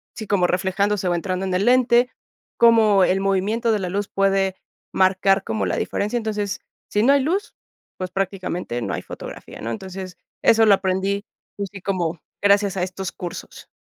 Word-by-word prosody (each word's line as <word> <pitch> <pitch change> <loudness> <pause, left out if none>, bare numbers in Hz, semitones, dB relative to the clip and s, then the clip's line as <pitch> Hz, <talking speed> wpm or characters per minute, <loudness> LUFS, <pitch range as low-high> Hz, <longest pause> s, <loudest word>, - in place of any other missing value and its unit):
sí, 220 - -7
como 185 -3 +2
reflejándose 190 +2 0
o 175 - +1
entrando 185 +2 -2
en 190 - -2
el 185 - +1
lente, 250 0 +4 0.5
cómo 220 -4 +5
el 190 +1 +1
movimiento 200 +4 +1
de 215 - +1
la 185 - -3
luz 200 +2 -2
puede 195 -1 +1 0.4
marcar 190 +1 +3
como 110 -3 -1
la 90 - -1
diferencia. 210 +4 -1
Entonces, 210 -3 -2 0.3
si 210 - +2
no 275 +4 +6
hay 280 - +4
luz, 380 +8 -1 0.4
pues 185 -1 -5
prácticamente 185 -9 -3
no 100 -5 -3
hay 90 - -3
fotografía, - - -9
¿no? 115 - -3
Entonces, 185 +7 -7 0.3
eso 225 0 +5
lo 210 - +7
aprendí 195 +1 -1 0.3
pues 200 -1 -3
sí, 195 - -9
como 175 -4 -2 0.2
gracias 200 -1 +4
a 180 - 0
estos 185 0 -4
cursos. 175 -1 -8
195 Hz, 180 wpm, -22 LUFS, 185-210 Hz, 0.5 s, lo